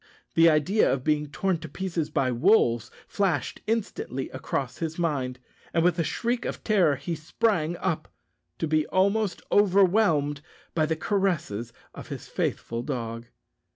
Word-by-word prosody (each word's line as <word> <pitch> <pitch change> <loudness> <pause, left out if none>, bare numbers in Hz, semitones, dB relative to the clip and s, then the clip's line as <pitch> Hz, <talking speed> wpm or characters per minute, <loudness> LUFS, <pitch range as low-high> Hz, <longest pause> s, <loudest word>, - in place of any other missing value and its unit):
The 165 0 +6
idea 165 +7 +3
of 130 -2 -1
being 150 0 +1
torn 185 +2 0
to - - -8
pieces 170 -5 -3
by 135 -4 +1
wolves 120 - +3 0.2
flashed 180 -10 -1
instantly 200 - -2
across 130 -1 -3
his 165 -1 -3
mind, 140 -7 -1 0.4
and 165 - +3
with 175 0 +2
a - - +3
shriek 240 +8 -1
of - - -5
terror 190 -9 +3
he 140 +6 -4
sprang 170 +1 0
up 165 -4 -2 0.5
to 160 - -1
be 155 0 +1
almost 200 +1 +1
overwhelmed 185 -7 +3 0.3
by 155 -2 +2
the 160 - 0
caresses 160 - -1 0.2
of - - -9
his - - -7
faithful 115 0 -2
dog. 115 -3 -4
160 Hz, 150 wpm, -26 LUFS, 140-190 Hz, 0.5 s, The